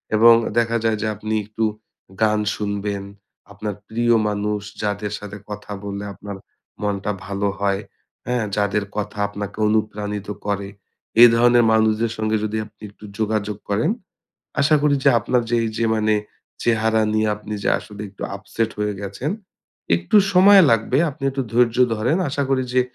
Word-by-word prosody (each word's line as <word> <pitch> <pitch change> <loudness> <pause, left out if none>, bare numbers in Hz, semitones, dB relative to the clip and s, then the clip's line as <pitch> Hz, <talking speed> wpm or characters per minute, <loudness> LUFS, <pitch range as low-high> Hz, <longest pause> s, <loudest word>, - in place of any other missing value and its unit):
এবং 115 +2 +8 0.2
দেখা 115 0 +2
যায় 110 -1 +1
যে 110 - -1
আপনি 110 +2 -4
একটু 110 +1 -4 0.6
গান 110 -1 +3 0.2
শুনবেন, 100 -1 -3 0.5
আপনার 100 0 -5
প্রিয় 120 +1 +2
মানুষ 105 0 -2 0.2
যাদের 105 0 -2
সাথে 105 0 -8
কথা 105 0 -7
বললে 100 0 -5
আপনার 100 0 -8 0.4
মনটা 105 0 -1
ভালো 100 +1 -1
হয় 100 0 0 0.5
হ্যাঁ? 125 -2 0
যাদের 105 0 +1
কথা 105 0 -3
আপনাকে 100 0 -7
অনুপ্রাণিত 105 -1 -1 0.2
করে, 100 -1 -2 0.5
এই 120 - +12
ধরনের 120 0 +5
মানুষদের 110 +1 +2
সঙ্গে 110 0 0
যদি 110 +1 -2
আপনি 105 0 -21
একটু 105 +1 -14
যোগাযোগ 105 -1 -1
করেন, 110 - +1 0.7
আশা 155 +2 +4
করি 145 -1 +3
যে 140 - +7
আপনার 120 +2 +1
যে - - +2
এই 110 - -1
যে 115 - +1
মানে 110 0 +2 0.5
চেহারা 110 -1 +2
নিয়ে 110 0 +2
আপনি 105 0 -9
যে - - 0
আসলে 105 -1 -11
একটু 95 - -11
upset 110 +2 -3
হয়ে 105 -1 -1
গেছেন, 100 +9 -4 0.7
একটু 85 - +1 0.2
সময় 195 +1 +8
লাগবে 115 +4 +2
আপনি 135 - -8
একটু 135 0 -2
ধৈর্য 120 -1 +3 0.2
ধরেন। 125 - +1
আশা 140 +1 -1
করি 130 -1 +2
যে 130 - +5
110 Hz, 160 wpm, -21 LUFS, 105-115 Hz, 0.7 s, এই